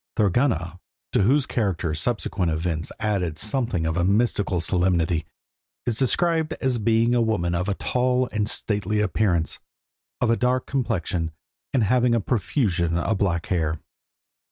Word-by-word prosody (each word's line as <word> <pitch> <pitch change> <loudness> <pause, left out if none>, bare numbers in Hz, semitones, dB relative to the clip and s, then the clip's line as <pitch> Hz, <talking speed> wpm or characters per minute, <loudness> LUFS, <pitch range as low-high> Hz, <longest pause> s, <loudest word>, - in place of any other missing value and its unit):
Thorgunna, 95 - +1 0.3
to - - +2
whose 135 +7 +3
character 95 -8 -1
subsequent 90 0 -1
events 80 0 -2
added 95 -7 -1
something 110 - -1
of 80 +1 -1
a 85 - +2
mystical 100 -2 +1
solemnity, 85 -2 +1 0.6
is 120 - 0
described 160 +4 +1
as 130 -5 -1
being 115 +2 +2
a 120 - +3
woman 95 -7 0
of 90 +3 -1
a 100 - 0
tall 125 +2 +1
and 105 -1 -1
stately 105 -1 -1
appearance, 100 -6 0 0.6
of 120 - +2
a - - +4
dark 125 +1 +1
complexion, 100 - -1 0.4
and 130 -4 +2
having 120 +2 +3
a - - +2
profusion 95 - 0
of 100 +6 0
black 85 -4 0
hair. 80 -3 0
105 Hz, 145 wpm, -24 LUFS, 85-120 Hz, 0.6 s, a